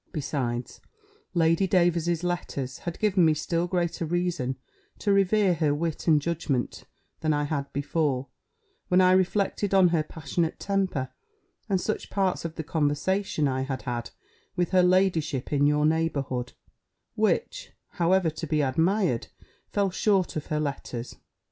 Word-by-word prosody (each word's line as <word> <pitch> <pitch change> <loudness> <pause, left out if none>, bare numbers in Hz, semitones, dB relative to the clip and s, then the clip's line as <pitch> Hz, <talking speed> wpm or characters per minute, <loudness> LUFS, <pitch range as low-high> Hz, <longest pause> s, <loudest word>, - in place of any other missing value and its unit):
Besides, 130 -6 -3 0.5
Lady 165 +3 +3
Davers's 175 -2 +2
letters 145 -7 -3
had 170 -1 -5
given 200 -4 +2
me 160 -1 +4
still 170 +3 -1
greater 175 -2 -1
reason 170 -6 -1 0.4
to 205 - +1
revere 195 0 +3
her 150 -3 +1
wit 165 +2 -3
and 155 -2 +5
judgment 145 -5 -2 0.3
than 155 -1 +1
I 145 0 0
had 140 -2 -3
before, 140 -2 -1 0.6
when 180 -1 +4
I 185 0 +6
reflected 195 +2 +1
on 185 -2 +6
her 165 -2 +2
passionate 160 +1 -3
temper, 190 -10 -1 0.6
and 190 -2 +2
such 215 +4 -3
parts 190 -2 0
of 165 -1 -5
the 160 - -4
conversation 155 +2 0
I 130 -1 -1
had 135 -1 -4
had 120 -2 -3 0.5
with 175 -2 0
her 185 -1 +5
ladyship 175 -7 +1
in 145 0 +4
your 150 0 +2
neighbourhood; 140 -6 -1 0.6
which - - 0 0.2
(however 175 -1 +2
to 160 +1 -6
be 150 0 +1
admired) 160 - +1 0.4
fell 200 -2 0
short 195 -1 +1
of 155 - -4
her 150 - -1
letters. 130 -4 -4
165 Hz, 145 wpm, -26 LUFS, 145-180 Hz, 0.6 s, I